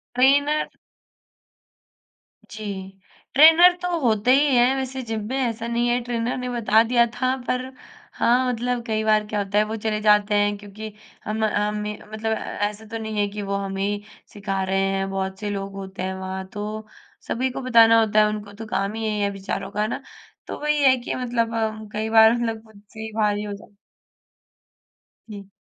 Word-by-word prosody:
Trainer 285 +4 +3 1.8
जी। 215 0 -8 0.7
Trainer 325 +5 +8
तो 355 -1 -1
होते 235 -2 +2
ही 290 +2 +4
हैं 245 +2 +4
वैसे 265 0 -4
जिम 225 -2 -4
में, 265 - -2
ऐसा 235 -3 -2
नहीं 235 +1 0
है। 240 +1 +2
ट्रेनर 240 0 -2
ने 250 0 -4
बता 225 -2 +3
दिया 235 0 +3
था 255 +1 0
पर 255 0 -1 0.5
हाँ, 250 +2 +3
मतलब 245 0 -2
कई 220 -1 -1
बार 215 -1 +3
क्या 210 0 -2
होता 200 0 -1
है 210 - +5
वो 215 +1 -4
चले 215 -1 0
जाते 210 -1 +4
हैं 205 0 +2
क्योंकि 210 +2 -9 0.3
हम 220 +1 -2
हमें 210 0 -1 0.2
मतलब 220 +1 -2
ए - - +2 0.3
ऐसा 210 +1 -9
तो 225 - -3
नहीं 220 -1 -5
है 205 - +2
कि 210 +1 -6
वो 200 0 -3
हमें 195 -1 -3
ही 205 +1 -1 0.3
सिखा 195 -1 -3
रहे 190 +1 0
हैं, 195 0 0
बहुत 190 0 -3
से 210 -1 -3
लोग 195 -1 -4
होते 195 -1 -7
हैं 190 0 -2
वहाँ। 190 0 -5
तो 215 +1 -5 0.4
सभी 260 +3 -1
को 250 - -5
बताना 230 -3 +6
होता 215 -1 +3
है 215 - +5
उनको 205 -1 -6
तो 220 +2 -8
काम 200 -1 -1
ही 225 0 -4
यही 210 -1 -1
है 200 - +1
बेचारों 195 0 -5
का, 210 - -2
है 215 - +1
ना। - - -4 0.5
तो - - -6
वही 300 0 +1
है 260 -1 +6
कि 240 - -4
मतलब 235 -2 -1
हम 220 -1 -2
कई 215 +1 -2
बार 220 0 +7
मतलब 225 -2 -2
खुद 215 -2 -18
से 220 - -11
ही 220 0 -6
भारी 210 -1 +1
हो 205 -1 -5
जा 200 - -11 1.6
जी। 200 -2 -9
220 Hz, 195 wpm, -23 LUFS, 205-240 Hz, 1.8 s, ट्रेनर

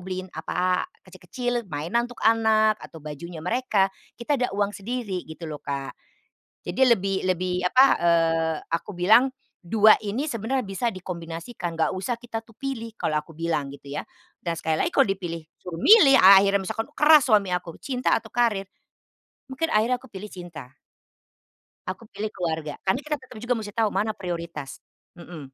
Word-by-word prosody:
beliin 185 0 -6
apa, 180 +3 -1 0.2
kecil 185 -1 -15
kecil 245 -1 -2 0.2
mainan 175 +11 -1
untuk 245 - -12
anak, 220 -1 +3
atau 160 -2 -12
bajunya 155 +2 -8
mereka, 200 -3 +1 0.2
kita 260 +3 -1
ada 250 - +1
uang 205 0 0
sendiri 205 -3 -4
gitu 160 +2 -9
loh, 155 -2 -6
Kak. 140 -1 -4 0.7
Jadi - - -5
lebih 195 -5 +2
lebih 180 0 0
apa, 255 +8 +5 0.2
eee, 165 -1 +2
aku 170 +4 -3
bilang, 215 +9 +5 0.4
2 215 +3 +6
ini 230 +9 -3
sebenarnya 240 +3 -1
bisa 195 +2 -3
dikombinasikan, 170 +1 -6
enggak 160 0 +1
usah 190 +6 -2
kita 230 -1 -7
tuh 225 - -19
pilih 230 -3 -5
kalau 155 -8 -1
aku 150 +2 -9
bilang 155 -4 -2
gitu 140 0 -12
ya. 145 - -5 0.3
Dan 170 -1 -3
sekali 160 -1 -1
lagi - - -1
kalau 275 -6 +4
dipilih 175 -4 -4 0.2
suruh 175 -2 -7
milih 385 -11 +8
akhirnya 195 +1 +7
misalkan 225 +4 -3
keras 300 -2 +6
suami 210 -6 +3
aku, 180 -2 -3
cinta 255 -2 0
atau 220 -1 -3
karir? 210 -6 0 0.8
Mungkin 325 +5 -1
akhirnya 240 0 +1
aku 265 - -15
pilih 210 -1 -9
cinta. 165 -8 -10 1.2
Aku 190 +5 -6
pilih 215 +1 -4
keluarga. 160 -5 -4
Karena 190 +7 +2
kita 300 -1 -3
tetap 260 -1 -15
juga 245 +1 +1
mesti 210 -1 -8
tahu 225 -3 +2
mana 215 +3 -1
prioritas, 170 -7 -6 0.4
mhm. 160 -6 -10
195 Hz, 165 wpm, -25 LUFS, 170-230 Hz, 1.2 s, milih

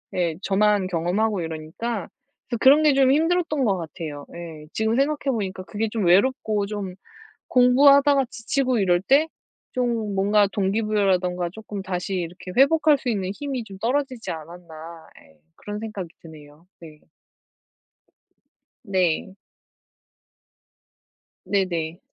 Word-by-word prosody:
예, 170 -3 0
저만 205 0 +2
경험하고 185 +4 0
이러니까. 165 +7 -5 0.4
그래서 240 - -2
그런 285 +4 +6
게 300 -2 +5
좀 270 -1 +4
힘들었던 325 -1 +1
것 195 -4 +1
같아요. 155 -3 -7
예. 160 -3 -9
지금 220 +1 0
생각해 275 0 0
보니까 190 -4 -4
그게 215 +3 -3
좀 215 -4 -1
'외롭고 205 +2 +2
좀 200 -3 -5 0.5
공부하다가 275 +2 +5
지치고 255 +1 -1
이럴 175 -2 +3
때 280 - +3 0.4
좀 235 -5 -1
뭔가 205 +1 +3
동기부여라든가 195 -4 0
조금 210 -1 -7
다시 185 0 -3
이렇게 180 +1 -5
회복할 300 +3 +5
수 255 - -6
있는 190 -4 -2
힘이 275 -2 -4
좀 195 -3 -11
떨어지지 255 +2 -2
않았나.' 165 0 -10 0.2
예. 80 - -23 0.2
그런 205 0 -7
생각이 210 -5 -6
드네요. 155 0 -15
네. 155 -3 -13 1.8
네. 190 -2 0 2.1
네네. 175 -4 -1
200 Hz, 270 characters per minute, -23 LUFS, 175-250 Hz, 2.1 s, 그런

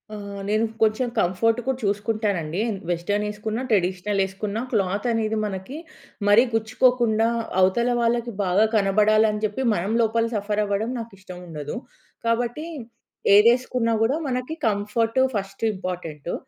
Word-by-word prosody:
ఆహ్, 200 -1 -7
నేను 215 +2 +2 0.2
కొంచెం 220 +3 +2
కంఫోర్ట్ 220 +6 +2
కూడా 265 -1 0
చూసుకుంటానండి. 205 -5 -1 0.3
వెస్ట్రన్ 175 +5 0
ఏసుకున్న, 215 +2 -4
ట్రెడిషనల్ 195 0 0
ఏసుకున్నా 200 +3 -4
క్లాత్ 200 -1 0
అనేది 220 -1 0
మనకి 195 +7 -5 0.5
మరీ 205 +4 +7
గుచ్చుకోకుండా 225 0 +2 0.3
అవతల 190 +6 +3
వాళ్ళకి 235 0 0
బాగా 190 +3 +3
కనబడాలని 210 +1 +3
చెప్పి 210 +5 -3
మనం 195 +2 -1
లోపల 230 0 +2
సఫర్ 210 +1 -1
అవ్వడం 205 +3 -1
నాకు 230 0 -7
ఇష్టం 185 -2 -10
ఉండదు. 150 -3 -6 0.5
కాబట్టి 240 +6 0 0.7
ఏదేసుకున్నా 235 +1 +4
గూడా 260 +7 +2
మనకి 255 +3 -2
కంఫోర్ట్ 220 +3 0 0.2
ఫస్ట్ 195 +1 -4
ఇంపార్టెంటు. 175 -5 -5
210 Hz, 125 wpm, -24 LUFS, 195-230 Hz, 0.7 s, మరీ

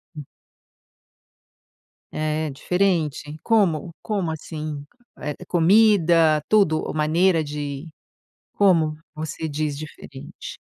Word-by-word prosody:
Hum. 150 - -7 1.9
É, 155 0 -2
diferente. 155 -1 -1
Como? 180 -8 +1
Como 195 -7 -2
assim? 155 -2 -6 0.4
Eh, 150 -1 -4
comida, 170 -4 +4
tudo 195 -8 +3
ou - - -4
maneira 160 +3 +2
de 145 0 -5 0.7
Como 165 -6 +3 0.2
você 155 +1 -5
diz 150 -1 -2
diferente? 145 -2 -10
155 Hz, 90 wpm, -23 LUFS, 150-180 Hz, 1.9 s, comida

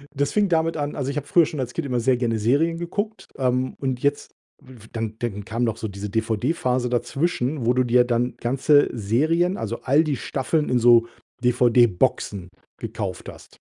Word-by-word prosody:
Das 140 +1 0
fing 210 -1 +2
damit 165 -1 +1
an 145 0 -3
also, 140 -1 -3
ich 140 - -5
habe 145 - -4
früher 170 -3 +5
schon 150 -2 -6
als 120 -2 -3
Kind 165 - -3
immer 125 -2 0
sehr 125 +1 +2
gerne 115 -2 0
Serien 150 +9 +1
geguckt, 205 +6 -4
ähm, 130 0 0
und 130 -2 -2
jetzt 145 0 -1 0.3
f 120 -4 -15
dann 110 -1 -4
dann 105 -4 -4
kam 115 +2 -2
noch 115 -2 -1
so 110 - -4
diese 100 +1 -6
DVD-Phase 125 +4 -1
dazwischen, 130 +1 -1
wo 120 - +3
du 130 - +2
dir 125 0 +4
dann 120 0 -1
ganze 135 +4 +3
Serien, 155 - +1
also, 115 +1 -4
all 145 +5 +3
die 150 -3 -1
Staffeln 145 +6 -1
in 125 -1 +2
so 120 0 +5 0.4
DVD-Boxen 120 -6 +2 0.3
gekauft - - -5
hast. - - -14
125 Hz, 190 wpm, -23 LUFS, 115-145 Hz, 0.4 s, früher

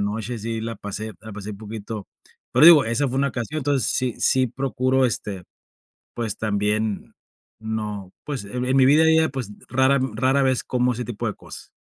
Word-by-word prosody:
noche, 110 +3 -3
sí, 115 +1 -4
la 115 0 -4
pasé 105 +2 -6
la 110 -1 -10
pasé 105 +1 -7
un 100 - -7
poquito 110 -1 -7 0.5
pero - - +5
digo, 160 -5 +9
esa 115 +5 0
fue 130 - -3
una 140 0 +2
ocasión, 130 +5 -4
entonces, 140 -5 0
sí, 125 -2 0
sí 130 -2 +3
procuro 130 +1 0
este, 100 -6 -2 0.7
pues, 115 -4 -3
también, 105 0 -1 0.5
no 105 -3 -5
pues, 140 -8 -4
e 100 - -11
en 125 +1 0
mi 130 - +6
vida 155 +4 +6
ya, 160 0 +4
pues, 130 -6 -5 0.2
rara 130 +2 +3 0.2
rara 130 +4 +2
vez 130 -2 +2
como 125 0 0
ese 120 +1 -4
tipo 120 0 -4
de 105 - -2
cosas. - - -10
115 Hz, 190 wpm, -23 LUFS, 105-130 Hz, 0.7 s, digo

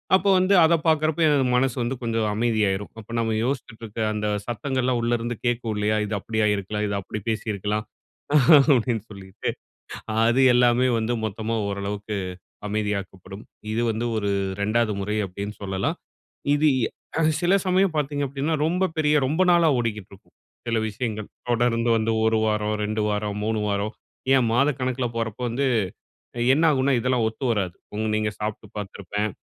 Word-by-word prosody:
அப்போ 195 +1 +2
வந்து 185 +2 +3
அதை 165 +1 +5
பாக்குறப்ப, 155 0 +2
எனது 145 -3 +3
மனசு 130 -1 +2
வந்து 120 +3 -2
கொஞ்சம் 115 -1 0
அமைதியாயிரும். 105 -3 0
அப்ப 110 - -13
நம்ம 110 -1 0
யோசிச்சிட்டு 125 -3 -4
இருக்கிற 110 +1 -4
அந்த 105 0 -2 0.2
சத்தங்கள்லாம் 125 +1 -1
உள்ளே 120 +1 +1
இருந்து 120 +1 -3
கேட்கும் 120 -2 0
இல்லையா, 105 +1 +1
"இது 105 - -5
அப்படியா 110 +1 0
இருக்கலாம். 105 +2 -3
இது 100 - -2
அப்படி 105 - -6
பேசியிருக்கலாம்." 105 -1 -2 0.9
அப்டீன்னு 115 -3 0
சொல்லிட்டு. 95 -1 -6 0.8
அது 120 +3 +3
எல்லாமே 125 +1 +4
வந்து 115 +2 0
மொத்தமா 110 +2 -3
ஓரளவிற்கு, 100 +1 -4 0.5
அமைதியாக்கப்படும். 100 -1 -4 0.3
இது 115 - 0
வந்து 110 +2 -2
ஒரு 105 -1 -1 0.3
2ஆவது 110 +1 +1
முறை 105 +2 -2
அப்டீன்னு 100 +3 -6
சொல்லலாம். 95 0 -2 0.6
இது 150 +1 +4 0.5
அ - - +3 0.2
சில 175 +2 +3
சமயம் 185 -1 +3
பாத்தீங்க 145 -1 -1
அப்டீன்னா 140 +4 -1
ரொம்ப 180 +3 +1
பெரிய 150 -1 +2
ரொம்ப 155 +7 0
நாளா 170 -1 +5
ஓடிக்கிட்டு 105 -5 -3
இருக்கும், 95 - -19 0.3
சில 115 -1 +1
விஷயங்கள். 110 -1 -4 0.2
தொடர்ந்து 120 0 +2
வந்து 110 0 0
1 110 0 +3
வாரம், 105 0 0
2 105 +1 -1
வாரம், 105 0 -2
3 110 0 0
வாரம், 100 +1 -1 0.4
ஏன் 125 -3 +3
மாதக்கணக்கில 130 -1 +1
போறப்ப 110 -1 -3
வந்து 135 +4 -1 0.7
அ - - -3 0.2
என்ன 160 - +2
ஆகும்ன்னா, 135 -1 +2
இதெல்லாம் 125 -1 +1
ஒத்து 110 +4 -6
வராது. 95 -6 -1 0.2
ம், 110 0 -1
நீங்க 110 0 0
சாப்ட்டு 105 0 -4
பாத்திருப்பேன். 105 +1 -3
110 Hz, 155 wpm, -24 LUFS, 105-130 Hz, 0.9 s, அதை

